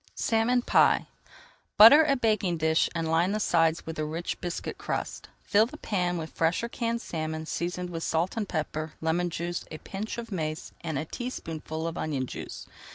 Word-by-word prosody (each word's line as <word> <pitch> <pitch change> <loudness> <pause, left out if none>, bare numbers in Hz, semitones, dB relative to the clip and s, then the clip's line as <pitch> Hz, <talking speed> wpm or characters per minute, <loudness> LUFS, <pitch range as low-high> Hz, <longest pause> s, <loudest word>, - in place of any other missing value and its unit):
SALMON 235 +2 +2
PIE - - +4 0.7
Butter 275 +9 +10
a 285 -3 +3
baking 215 -8 +1
dish 160 0 +2
and 165 -1 -1
line 170 +4 +2
the 215 - 0
sides 165 -5 +2
with 160 -1 -6
a - - 0
rich 160 +3 -4
biscuit 175 0 -4
crust. - - -4
Fill 215 +2 +4
the 300 - -10
pan 180 -8 -1
with 160 -1 -5
fresh 165 +6 +1
or 235 - -2
canned 235 0 -2
salmon, 160 -1 -4
seasoned 175 +2 -3
with 165 -1 -4
salt 165 +3 0
and 215 -3 -2
pepper, 155 -1 -3
lemon 170 +2 0
juice, 175 +1 -3
a 155 - -6
pinch 200 +8 -6
of 230 -1 -6
mace, 155 -4 -3
and 160 -4 -2
a 155 - -2
teaspoonful 160 - -5
of 165 0 -3
onion 140 -4 -1
juice. - - -7
170 Hz, 185 wpm, -28 LUFS, 160-215 Hz, 0.7 s, Butter